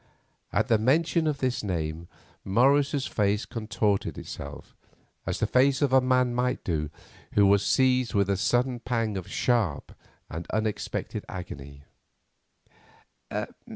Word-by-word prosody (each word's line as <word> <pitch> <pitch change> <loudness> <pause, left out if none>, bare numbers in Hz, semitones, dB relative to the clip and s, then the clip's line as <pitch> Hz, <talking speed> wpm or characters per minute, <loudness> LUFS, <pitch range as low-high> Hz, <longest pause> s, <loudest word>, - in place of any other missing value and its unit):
At - - +1
the 110 -2 +3
mention 155 +7 +2
of 150 -2 0
this 130 -2 -1
name 85 -3 -3 0.4
Morris's 135 +6 +3
face 105 0 0
contorted 110 -3 -1
itself, 70 +1 -8 0.5
as - - -2
the - - +2
face 135 +2 +3
of 140 -3 +1
a 130 - +7
man 125 -1 +2
might 125 +1 0
do 75 -4 -1 0.4
who 100 - +5
was 100 0 +4
seized 130 -3 +2
with 100 -1 +3
a 100 - +1
sudden 125 +4 +1
pang 115 -3 -1
of 95 -3 -5
sharp 110 - 0 0.4
and 80 +2 -6
unexpected 110 -2 -2
agony. 70 -6 -8
115 Hz, 130 wpm, -27 LUFS, 95-130 Hz, 0.5 s, a